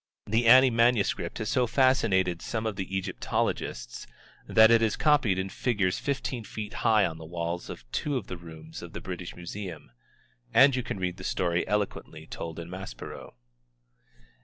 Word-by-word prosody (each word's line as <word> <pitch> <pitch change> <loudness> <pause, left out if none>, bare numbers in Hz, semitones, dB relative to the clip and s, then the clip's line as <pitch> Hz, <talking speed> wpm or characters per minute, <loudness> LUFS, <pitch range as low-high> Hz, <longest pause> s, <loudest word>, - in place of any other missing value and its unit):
The 115 +3 +1
Ani 130 +2 +8
manuscript 115 -7 +2
has 110 -2 -3
so 125 -1 +2
fascinated 110 -9 +2
some 110 -1 -3
of 110 -2 -2
the 95 0 -3
Egyptologists 90 -8 -3 0.4
that 110 +1 +6
it 115 -1 +6
is 110 -2 +2
copied 145 -11 +3
in 95 +1 -2
figures 100 -5 0
fifteen 135 -4 -3
feet 105 0 -7
high 110 -2 +4
on 80 -1 -4
the - - -9
walls 85 +1 -4
of - - -8
two 145 -2 -1
of 115 - -5
the 90 - -6
rooms 80 -2 -10
of - - -10
the - - -5
British 90 -1 -7
Museum. 85 -5 -7 0.6
And 135 +2 +7
you 130 - 0
can 100 - -5
read 90 -1 -2
the 90 - -9
story 85 -2 0
eloquently 105 -1 -3
told 80 -1 -7
in 85 -1 -6
Maspero. 90 -11 -8
100 Hz, 170 wpm, -28 LUFS, 85-115 Hz, 0.6 s, Ani